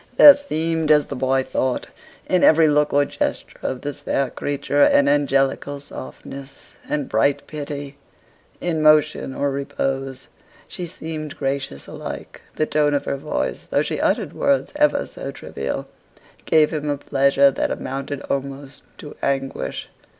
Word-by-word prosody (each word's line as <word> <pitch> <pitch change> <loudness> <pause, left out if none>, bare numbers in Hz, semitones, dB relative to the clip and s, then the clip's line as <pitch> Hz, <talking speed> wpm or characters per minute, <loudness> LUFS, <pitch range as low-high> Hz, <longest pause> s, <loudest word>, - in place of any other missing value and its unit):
There 290 -1 +11
seemed, 165 - -2
as 150 -1 +5
the 140 - -6
boy 130 0 +1
thought, 130 -1 -1 0.4
in 185 -1 +2
every 160 0 +6
look 150 0 +3
or 145 0 +3
gesture - - -3
of 130 - -3
this 145 0 -5
fair 135 -2 -1
creature, 145 0 -1
an 140 0 +5
angelical 140 0 +1
softness 135 - -10 0.2
and 145 -2 -1
bright 140 +6 +1
pity 145 -2 -6 0.6
in 165 -3 -1
motion 155 -3 +3
or 140 0 0
repose 135 -1 -3 0.4
she 180 -2 -6
seemed 155 -3 -6
gracious 135 - -3
alike; - - -8
the 155 - +1
tone 150 -1 +2
of 140 - -1
her - - -1
voice, 150 +3 -3
though - - +2
she - - -3
uttered - - 0
words 280 0 +1
ever 300 0 +2
so - - -7
trivial, - - -5 0.6
gave 155 -1 +4
him 150 -1 -2
a 145 - 0
pleasure 140 0 +3
that - - -1
amounted 135 +1 -4
almost 140 0 -5 0.2
to 150 - -10
anguish. 135 - -2
145 Hz, 150 wpm, -22 LUFS, 135-155 Hz, 0.6 s, There